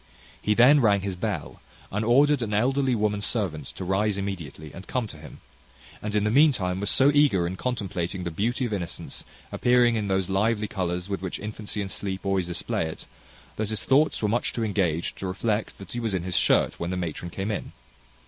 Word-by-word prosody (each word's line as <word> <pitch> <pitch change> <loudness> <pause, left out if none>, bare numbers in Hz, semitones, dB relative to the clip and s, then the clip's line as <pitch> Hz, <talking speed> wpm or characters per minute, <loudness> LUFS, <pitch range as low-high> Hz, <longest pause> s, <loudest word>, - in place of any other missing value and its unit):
He 105 - +1
then 130 +6 +7
rang 100 -4 +4
his 95 -1 -3
bell, 90 - -4 0.3
and 105 +3 -1
ordered 140 +4 +4
an 105 -3 -1
elderly 130 +3 +2
woman 105 -1 0
servant 95 - -1
to 95 - -5
rise 100 +2 +1
immediately, 80 -7 -5
and 95 +2 -10
come 125 -2 -1
to 100 - -10
him; 75 - -12 0.6
and 105 0 -3
in 105 - +2
the 105 - +1
meantime 115 -10 +3
was 100 - +1
so 135 +2 +5
eager 140 -12 +4
in 90 +2 -3
contemplating 95 -6 -3
the 85 - -3
beauty 120 +9 -1
of 115 - -3
innocence, 90 -5 -5 0.3
appearing 120 -1 +3
in 105 -2 -1
those 95 -1 +1
lively 105 +2 +1
colours 90 -2 -3
with 100 -2 -3
which 95 -2 -4
infancy 105 0 -4
and 95 -1 -4
sleep 95 0 -4
always 95 -2 +1
display 85 -2 -1
it, 80 - -8 0.5
that 110 -1 -1
his 110 -4 -1
thoughts 140 -2 +2
were - - +3
too - - 0
much 120 +1 -1
engaged 95 -7 -1
to 95 - -3
reflect 105 +3 -2
that 100 - -10
he 120 - -3
was 110 -4 -1
in 90 - -2
his 90 -1 -3
shirt - - +3
when 85 - -2
the 95 - -2
matron 85 0 -4
came 95 +5 -3
in. 105 - -4
100 Hz, 210 wpm, -26 LUFS, 90-115 Hz, 0.6 s, then